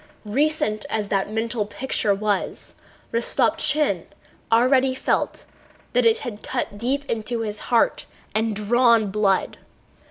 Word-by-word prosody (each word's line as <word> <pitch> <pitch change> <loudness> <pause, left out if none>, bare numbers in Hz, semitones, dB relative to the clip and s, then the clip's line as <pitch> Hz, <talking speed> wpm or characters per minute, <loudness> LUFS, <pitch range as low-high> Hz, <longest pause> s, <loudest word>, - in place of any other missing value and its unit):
Recent 220 -2 0
as 210 -2 -2
that 195 +1 0
mental 225 -1 -2
picture 220 -2 -1
was, 205 -1 -2 0.4
Rostopchín 260 +5 +1 0.5
already 255 +3 +4
felt - - -1 0.5
that - - +4
it 450 0 +4
had 220 -4 -6
cut 245 -5 -3
deep 270 +5 -1
into 230 -1 -2
his 210 -1 -3
heart 235 -2 +2 0.3
and 220 0 0
drawn 230 0 +3
blood. 195 -2 +1
225 Hz, 120 wpm, -23 LUFS, 210-255 Hz, 0.5 s, already